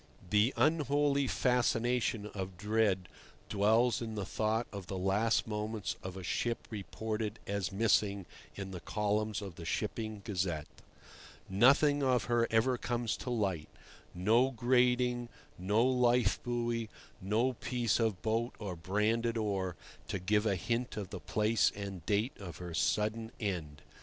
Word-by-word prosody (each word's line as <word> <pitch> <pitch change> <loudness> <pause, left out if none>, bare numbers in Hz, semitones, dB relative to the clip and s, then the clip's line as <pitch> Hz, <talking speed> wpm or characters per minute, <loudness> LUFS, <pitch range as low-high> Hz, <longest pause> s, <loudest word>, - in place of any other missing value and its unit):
The 105 +4 +4
unholy 145 -2 +2
fascination 120 -3 +1
of 95 -2 -5
dread 105 -2 +1 0.4
dwells 110 +3 +3
in 110 -2 -4
the 100 -2 -3
thought 110 +4 0
of 100 -3 -7
the 95 - -4
last 100 +5 +2
moments 105 -1 -3
of 95 0 -6
a 95 - -7
ship 115 +5 -2
reported 110 +1 -3
as 100 -2 -2
"missing" 100 -2 +2 0.3
in 95 -1 -6
the 90 - -6
columns 105 +2 -1
of 95 -5 -8
the - - -8
Shipping 110 +5 -3
Gazette. 90 -7 -1 0.8
Nothing 140 +8 +5
of 130 -4 +2
her 120 +1 +2
ever 120 +3 +2
comes 120 -2 -1
to - - -6
light—no 105 +2 0
grating, 125 0 +2 0.3
no 105 +6 +2
lifebuoy, 120 -2 +1 0.3
no 110 +7 +1
piece 120 0 0
of 110 -5 0
boat 115 +2 0
or 100 -4 -5
branded 110 +7 0
oar—to 100 -3 -3
give 105 +4 +1
a 100 - +2
hint 115 +7 -2
of 100 -3 -5
the - - -5
place 110 0 +2
and 100 -4 -6
date 105 +5 +1
of 90 -6 -8
her 90 -2 -7
sudden 110 +5 0
end. 80 -8 -4
110 Hz, 135 wpm, -33 LUFS, 100-120 Hz, 0.8 s, Nothing